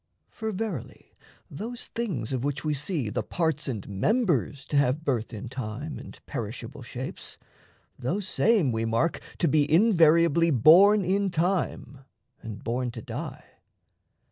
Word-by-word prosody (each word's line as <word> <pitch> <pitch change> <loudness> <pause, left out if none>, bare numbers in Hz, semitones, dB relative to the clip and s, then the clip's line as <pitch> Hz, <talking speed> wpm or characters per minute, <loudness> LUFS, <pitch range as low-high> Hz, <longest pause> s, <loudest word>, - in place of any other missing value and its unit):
For, 220 -1 -4
verily, 195 - -5 0.3
those 230 +10 -7
things 165 - -3
of 130 -1 -2
which 145 +1 -2
we 150 - +1
see 145 - -2
The - - -1
parts 160 -4 -1
and 110 -7 -4
members 145 - 0
to 145 - +1
have 140 +2 +2
birth 120 -7 -1
in 110 +1 -6
time 125 +5 -5
And - - -11
perishable - - -6
shapes, - - -7 0.6
those 185 +10 -2
same 195 - +3
we 115 0 -1
mark 115 +9 +1 0.2
To 170 - +2
be 150 0 +2
invariably 170 -3 +5
born 180 - +6
in 195 +2 +1
time 170 -6 -1 0.4
And 110 -3 -8
born 125 +2 -1
to 115 -2 -8
die. - - -6
150 Hz, 145 wpm, -27 LUFS, 125-185 Hz, 0.6 s, born